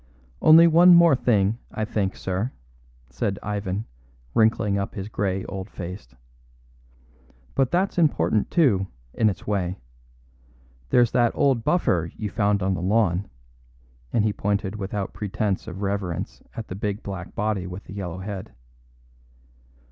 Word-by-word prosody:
"Only 160 Hz, +2 st, +8 dB
one 170 Hz, +2 st, +7 dB
more 170 Hz, -4 st, +7 dB
thing, 110 Hz, -2 st, +1 dB
I 110 Hz, -, -2 dB
think, 100 Hz, -3 st, -1 dB
sir," 95 Hz, +7 st, -3 dB, 0.6 s
said 100 Hz, -1 st, -2 dB
Ivan, 100 Hz, 0 st, -3 dB, 0.5 s
wrinkling 110 Hz, -2 st, +2 dB
up 100 Hz, -, -4 dB
his 100 Hz, +1 st, -5 dB
grey 95 Hz, -3 st, -2 dB
old 95 Hz, +1 st, -6 dB
face, 85 Hz, -9 st, -8 dB, 1.4 s
"but 135 Hz, -2 st, +2 dB
that's 185 Hz, +3 st, 0 dB
important, 110 Hz, -, +2 dB
too, 110 Hz, -, +3 dB, 0.3 s
in 110 Hz, -2 st, +3 dB
its 95 Hz, -, -6 dB
way. 95 Hz, -3 st, -1 dB, 1.1 s
There's 120 Hz, -2 st, +4 dB
that 120 Hz, -2 st, +3 dB
old 135 Hz, -5 st, +2 dB
buffer 90 Hz, -, +1 dB
you 105 Hz, -3 st, -4 dB
found 100 Hz, 0 st, +1 dB
on 95 Hz, 0 st, +1 dB
the 90 Hz, -, -3 dB
lawn," 95 Hz, -1 st, +1 dB, 0.8 s
and 110 Hz, -, +2 dB
he 105 Hz, -, +1 dB
pointed 100 Hz, 0 st, -1 dB
without 100 Hz, -1 st, -4 dB
pretence 105 Hz, -1 st, -2 dB
of 95 Hz, +3 st, -6 dB
reverence 95 Hz, -4 st, -3 dB
at 115 Hz, -, -6 dB
the -, -, -6 dB
big 105 Hz, +1 st, -3 dB
black 95 Hz, -3 st, -7 dB
body 105 Hz, -4 st, -1 dB
with 90 Hz, +2 st, -7 dB
the -, -, -11 dB
yellow 90 Hz, -4 st, -5 dB
head. 95 Hz, -, -7 dB
100 Hz, 140 wpm, -24 LUFS, 95-115 Hz, 1.4 s, Only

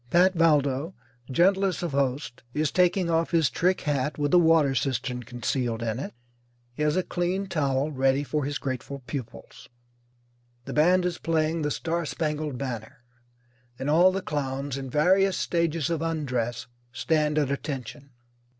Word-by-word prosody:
Pat 180 Hz, +4 st, +4 dB
Valdo, 150 Hz, -1 st, +2 dB, 0.3 s
gentlest 190 Hz, +6 st, +2 dB
of 170 Hz, -, -2 dB
hosts, 135 Hz, -2 st, -1 dB
is 150 Hz, 0 st, +1 dB
taking 180 Hz, 0 st, +2 dB
off 165 Hz, 0 st, +1 dB
his 165 Hz, -5 st, +2 dB
trick 185 Hz, +2 st, +1 dB
hat 145 Hz, -1 st, -1 dB
with 145 Hz, -1 st, 0 dB
the 180 Hz, -, +7 dB
water 160 Hz, -4 st, +4 dB
cistern 125 Hz, 0 st, -1 dB
concealed 120 Hz, 0 st, -2 dB
in 115 Hz, +1 st, -2 dB
it. 135 Hz, -, -6 dB, 0.6 s
He 140 Hz, -, -7 dB
has 150 Hz, +2 st, +2 dB
a 185 Hz, -, +2 dB
clean 180 Hz, +3 st, -1 dB
towel 145 Hz, -4 st, 0 dB
ready 135 Hz, 0 st, +2 dB
for 150 Hz, +1 st, -2 dB
his 145 Hz, +2 st, -2 dB
grateful 135 Hz, 0 st, -5 dB
pupils. 130 Hz, -5 st, -8 dB, 1.0 s
The -, -, -6 dB
band 175 Hz, +4 st, +4 dB
is 175 Hz, -1 st, -2 dB
playing 160 Hz, 0 st, 0 dB
"The 150 Hz, -, 0 dB
Star 170 Hz, +3 st, -2 dB
Spangled 150 Hz, -3 st, -2 dB
Banner," 125 Hz, 0 st, -6 dB, 0.7 s
and 135 Hz, +3 st, -2 dB
all 175 Hz, +4 st, +6 dB
the 190 Hz, 0 st, -3 dB
clowns, 140 Hz, -2 st, -3 dB
in 135 Hz, -1 st, -5 dB
various 185 Hz, +7 st, +3 dB
stages 170 Hz, -2 st, 0 dB
of 165 Hz, -2 st, -1 dB
undress, 125 Hz, -8 st, -2 dB, 0.3 s
stand 150 Hz, +2 st, 0 dB
at 145 Hz, -3 st, +1 dB
attention. 140 Hz, 0 st, -5 dB
150 Hz, 155 wpm, -26 LUFS, 135-170 Hz, 1.0 s, the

